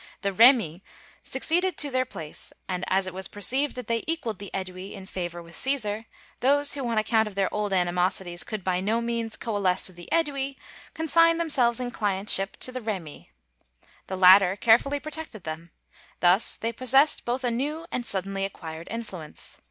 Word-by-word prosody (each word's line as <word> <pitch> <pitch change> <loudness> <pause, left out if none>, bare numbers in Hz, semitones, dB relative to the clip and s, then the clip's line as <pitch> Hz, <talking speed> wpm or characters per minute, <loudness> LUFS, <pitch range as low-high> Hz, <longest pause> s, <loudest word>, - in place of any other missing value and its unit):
The 200 - 0
Remi 215 - +5 0.4
succeeded 340 +6 0
to 290 -2 +3
their 255 0 +1
place, 160 -11 -6 0.2
and 185 -1 -3
as 190 0 +1
it 185 - -6
was 190 +1 -4
perceived 260 +8 +1
that 250 -2 -6
they 230 0 -1
equaled 275 - -2
the 200 -1 -7
Ædui 185 0 -6
in 195 -2 -9
favor 175 -2 -5
with 170 0 -15
Cæsar, 225 -3 -1 0.3
those 285 +2 +4
who 275 -3 -3
on 230 -1 -1
account 220 0 +2
of 205 - -9
their 195 -1 0
old 210 -1 -1
animosities 180 -1 0
could 215 -3 -6
by 180 -1 0
no 220 +4 0
means 235 -1 -2
coalesce 200 -5 +1
with 185 -2 -11
the 175 - -11
Ædui, 280 -4 0 0.4
consigned 330 +1 +3
themselves 255 -8 +2
in 245 -1 -3
clientship 195 -2 +1
to 255 - -3
the 255 0 -5
Remi. 190 -9 -6 0.8
The 190 - -4
latter 185 0 +7
carefully 235 +7 +3
protected 310 - -8
them. 160 +2 -7 0.5
Thus 180 +4 +3
they 230 +1 -3
possessed 270 +5 +3
both 245 +2 -2
a 245 - +1
new 295 +7 -3
and 250 - -2
suddenly 195 -2 +2
acquired 165 -4 -7
influence. 195 -9 -7
215 Hz, 175 wpm, -26 LUFS, 185-255 Hz, 0.8 s, latter